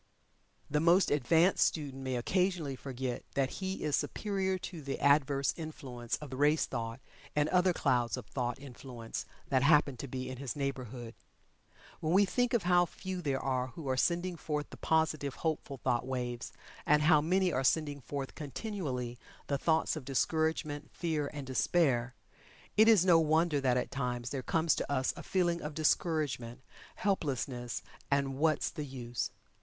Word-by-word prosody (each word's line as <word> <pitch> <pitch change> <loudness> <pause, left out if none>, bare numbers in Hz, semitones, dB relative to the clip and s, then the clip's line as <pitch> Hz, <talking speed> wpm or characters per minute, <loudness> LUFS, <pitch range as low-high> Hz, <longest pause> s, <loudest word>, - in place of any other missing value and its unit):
The 150 - +1
most 170 +4 +4
advanced 160 +6 +4
student 140 -4 -1
may 130 -1 -2
occasionally 175 +2 0
forget 130 -1 -4
that 135 -1 +1
he 190 0 -3
is 150 -2 +2
superior 190 -2 -1
to 180 -2 -7
the 135 -1 -4
adverse 140 -2 +3
influence 130 -7 -5
of 150 -3 -9
the 130 - -5
race 150 +2 +3
thought, 115 -1 -4 0.4
and 150 0 +3
other 180 0 +4
clouds 125 -8 +1
of - - -7
thought 120 +2 -2
influence 125 -3 -7 0.2
that 130 -2 +3
happen 145 -2 +4
to 140 - -6
be 130 0 -4
in 130 0 -6
his 135 +2 -4
neighborhood. 130 -4 -4 0.9
When 160 +2 0
we 200 +2 +6
think 245 +5 +1
of 230 - +1
how 175 0 +4
few 185 +1 -5
there 140 -5 0
are 130 -1 0
who 145 +3 -8
are 130 - +2
sending 175 +5 +1
forth 150 -2 -3
the - - -9
positive, 155 -3 +1
hopeful, 155 -4 -2
thought 125 0 0
waves, 125 -2 -3 0.3
and 150 0 +4
how 155 -1 +6
many 180 +3 +2
are 130 - +1
sending 145 0 +1
forth 140 0 -5
continually 140 - -4 0.3
the 140 -1 -1
thoughts 160 +2 +2
of 155 - -5
discouragement, 155 +2 0
fear, 155 -4 -1
and 145 -3 -6
despair, 130 -2 +1 0.6
it 220 +1 +6
is 210 -6 +6
no 170 -3 +7
wonder 160 -1 +2
that 125 -2 +2
at 125 - -2
times 125 -3 -2
there 135 - -2
comes 160 +4 +2
to - - -3
us 130 -2 +1
a - - -8
feeling 175 -2 0
of 150 0 -5
discouragement, 150 -6 0 0.3
helplessness, 135 - -2 0.3
and 140 -1 0
"what's 155 0 +2
the 150 -3 -5
use." 120 -3 -4
145 Hz, 170 wpm, -32 LUFS, 130-165 Hz, 0.9 s, no